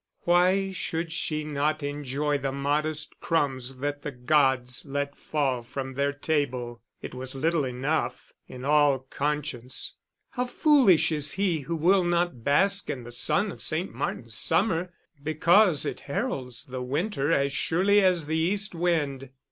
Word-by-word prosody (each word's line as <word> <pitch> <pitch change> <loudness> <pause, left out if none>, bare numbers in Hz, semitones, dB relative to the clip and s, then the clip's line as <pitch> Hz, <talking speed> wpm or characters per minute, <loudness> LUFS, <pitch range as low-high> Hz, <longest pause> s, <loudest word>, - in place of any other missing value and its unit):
Why 185 +3 +3
should 165 -2 -3
she 155 -1 -2
not 150 +1 -1
enjoy 145 0 -1
the 135 0 -2
modest 150 +2 -2
crumbs 135 -5 -1
that 145 +2 -3
the 150 - -4
gods 130 -1 +1
let 140 0 -3
fall 135 -5 -1
from 130 +2 -6
their 140 +2 0
table 140 -5 -2 0.2
it - - -6
was 130 +1 -6
little 160 +3 +1
enough, 130 0 -2
in 125 +1 -8
all 145 -1 +4
conscience! 130 -2 -3 0.4
How 250 0 -1
foolish 250 - +4
is 150 -1 -2
he 190 -5 0
who 165 +4 -4
will 180 +4 +3
not 175 -8 0
bask 195 - +2
in 125 - -3
the 120 - -9
sun 195 - +1
of - - -10
St. 165 +4 -1
Martin's 115 -2 -4
summer, 180 - +1 0.3
because 165 +3 +4
it - - -3
heralds 130 -3 -3
the 130 0 -6
winter 145 +3 -1
as 140 -3 +2
surely 200 +8 +3
as 180 -4 +3
the 160 +2 -1
east 195 +6 0
wind! 150 -6 -1
150 Hz, 150 wpm, -27 LUFS, 135-170 Hz, 0.4 s, all